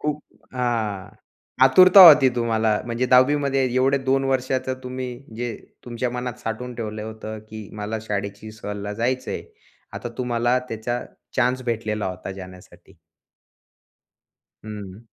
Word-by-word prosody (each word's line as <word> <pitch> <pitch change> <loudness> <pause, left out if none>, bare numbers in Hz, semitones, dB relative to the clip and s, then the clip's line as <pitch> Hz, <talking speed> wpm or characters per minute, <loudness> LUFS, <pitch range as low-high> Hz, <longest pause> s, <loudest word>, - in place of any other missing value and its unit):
खूप 150 0 -2 0.3
हां. 110 -6 -2 0.6
आतुरता 185 +8 +8
होती 145 -3 +7
तुम्हाला, 110 -2 +1
म्हणजे 120 +2 -1
10वी 130 +3 +5
मध्ये 135 -1 +1
एवढे 135 +2 +3
2 135 +1 +2
वर्षाचं 130 0 -1
तुम्ही 130 0 -5 0.3
जे, 120 0 -3 0.3
तुमच्या 120 0 -3
मनात 125 0 -4
साठवून 120 +2 -4
ठेवलं 110 -2 -5
होतं, 110 0 -7
की 110 -1 -10
मला 105 +2 -3
शाळेची 100 0 -5
सहलीला 105 -1 -6
जायचं 120 +4 -2
आहे. - - -4 0.5
आता 120 - -5
तुम्हाला 120 0 +1
त्याचा 120 +2 -3 0.4
चान्स 130 0 +1
भेटलेला 110 -3 -2
होता 95 0 -6
जाण्यासाठी. 90 -1 -13 1.7
हं. 105 -1 -8
120 Hz, 125 wpm, -23 LUFS, 110-130 Hz, 1.7 s, आतुरता